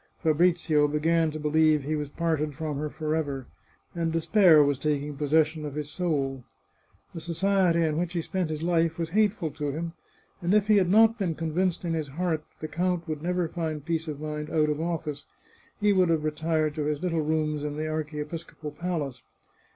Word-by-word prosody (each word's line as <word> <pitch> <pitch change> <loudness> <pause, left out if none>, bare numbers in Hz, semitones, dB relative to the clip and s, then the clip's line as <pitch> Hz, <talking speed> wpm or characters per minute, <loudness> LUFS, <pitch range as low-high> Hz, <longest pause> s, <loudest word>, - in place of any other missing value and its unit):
Fabrizio 160 -2 +3
began 160 +2 +2
to 155 0 -6
believe 155 0 +3
he 155 +3 -1
was 150 -2 -3
parted 155 -2 -1
from 155 -1 -3
her 150 0 -2
forever, 150 -4 -2 0.5
and 165 -1 -1
despair 165 -1 +5
was 140 -2 +1
taking 145 0 -1
possession 155 +2 +1
of 145 -2 -5
his 150 -1 -4
soul. 140 -6 -1 0.7
The 165 - -6
society 175 0 +2
in 155 0 0
which 175 0 -2
he 170 -2 -1
spent 185 -3 -2
his 155 0 -4
life 165 -1 +1
was 165 -1 -3
hateful 205 -5 +1
to 145 0 -3
him, 165 +3 -4 0.5
and 180 +4 +2
if 210 -2 +4
he 210 - +6
had 185 -3 +3
not 225 +3 +5
been 175 -5 -1
convinced 170 +3 -1
in 165 - -1
his 155 -2 -2
heart 160 +2 -2
that - - -36
the 155 - -3
count 175 +1 -1
would 155 -2 -4
never 180 0 0
find 160 -3 -4
peace 165 -1 -1
of 150 -2 -5
mind 150 0 -4
out 155 -2 +2
of 150 +1 -1
office, 160 -3 -3 0.5
he 205 -1 +3
would 185 -3 +3
have 160 -2 +1
retired 155 0 0
to 150 -1 -2
his 150 +2 -2
little 165 -3 0
rooms 155 -1 0
in 150 -1 -3
the 155 +1 -2
archiepiscopal 155 0 -5
palace. 150 -6 -3
160 Hz, 195 wpm, -27 LUFS, 150-170 Hz, 0.7 s, he